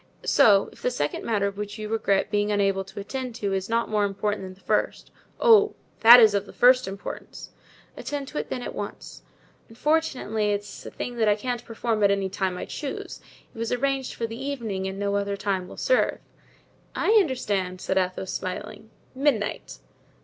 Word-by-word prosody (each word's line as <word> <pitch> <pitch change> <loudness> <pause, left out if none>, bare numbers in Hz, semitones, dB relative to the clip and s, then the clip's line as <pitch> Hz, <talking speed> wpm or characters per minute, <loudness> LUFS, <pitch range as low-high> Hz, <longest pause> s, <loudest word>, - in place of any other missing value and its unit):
So, 200 -2 +5
if - - -18
the - - +1
second 150 -12 -2
matter 200 -3 0
which 205 +2 -6
you 215 0 -5
regret 210 -2 0
being 205 0 +1
unable 195 -1 +1
to 190 - -9
attend 250 +4 -5
to 200 -3 -2
is 190 +1 -2
not 230 +1 +1
more 210 -1 +1
important 205 +1 -1
than 185 -1 -8
the - - -24
first——" - - -1 0.3
"Oh! 430 -3 +5 0.2
that 235 +2 +10
is 220 -3 +6
of 200 0 -1
the - - -12
first 250 -1 +5
importance." 195 +1 -8 0.4
"Attend 285 -2 -5
to 300 - -4
it, - - -5
then, 250 - -4
at - - -5
once." - - -7 0.5
"Unfortunately, 230 -6 0
it 205 - -1
is 205 - -11
a - - -5
thing 245 -1 -6
that 220 -2 +3
I 205 - +4
can't 240 +2 -4
perform 225 -2 -2
at 200 - +6
any 195 -1 0
time 190 -1 -2
I - - -5
choose. 285 -3 -6 0.3
It - - -11
was 230 0 -2
arranged 270 +1 -1
for 230 - -2
the 230 +3 -6
evening 225 -9 -3
and 190 0 -5
no 200 0 -1
other 200 0 -2
time 195 -3 -2
will - - -11
serve." - - +2 0.8
"I - - +1
understand," 205 - -1
said 190 +1 0
Athos 185 0 -2
smiling, 185 +3 -6 0.2
"midnight." 260 -6 -1
210 Hz, 195 wpm, -25 LUFS, 200-245 Hz, 0.8 s, that